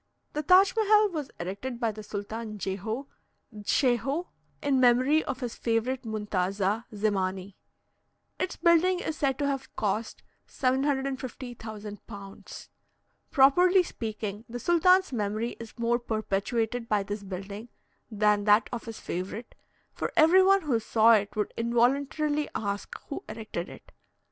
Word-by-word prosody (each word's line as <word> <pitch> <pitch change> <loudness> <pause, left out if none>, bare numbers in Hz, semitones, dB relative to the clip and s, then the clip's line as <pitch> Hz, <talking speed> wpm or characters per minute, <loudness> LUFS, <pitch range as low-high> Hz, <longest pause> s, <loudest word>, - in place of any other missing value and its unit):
The 300 - -1
Taj 370 - +6
Mehal 425 -2 +4
was 300 -5 -4
erected 200 +8 -5
by 230 -3 +1
the 215 0 -9
Sultan 215 +1 -6
Jehoe 205 +7 -3 0.5
(Dschehoe), 265 - 0 0.3
in 275 -2 +2
memory 255 +5 +4
of 255 - -4
his 240 -2 -3
favourite 240 +3 -1
muntaza, 205 0 -1
Zemani. 195 -2 -1 0.9
Its 370 - -2
building 350 +2 +3
is 320 - -3
said 270 -4 0
to 285 - -1
have 275 -1 -3
cost 215 +2 -2 0.2
750,000 255 -5 -3
pounds. 200 -3 -10 0.6
Properly 355 +7 +5
speaking, 215 - -5
the 245 +1 -5
sultan's 365 +3 +4
memory 215 +1 -1
is 230 0 -10
more 235 +1 +1
perpetuated 225 +1 -2
by 210 -2 +2
this 205 +1 -5
building 200 +4 -7 0.4
than 210 -1 +2
that 210 +1 +4
of 235 - -4
his 225 -1 -7
favourite, 190 +6 -5 0.4
for - - -3
every 330 +5 +7
one 390 0 +4
who 260 -7 +1
saw 225 +1 +4
it 205 -1 +1
would 210 -1 -2
involuntarily 275 +6 +1
ask 200 -1 -3
who 280 - -5
erected 215 -5 -5
it. - - -13
230 Hz, 135 wpm, -28 LUFS, 210-275 Hz, 0.9 s, every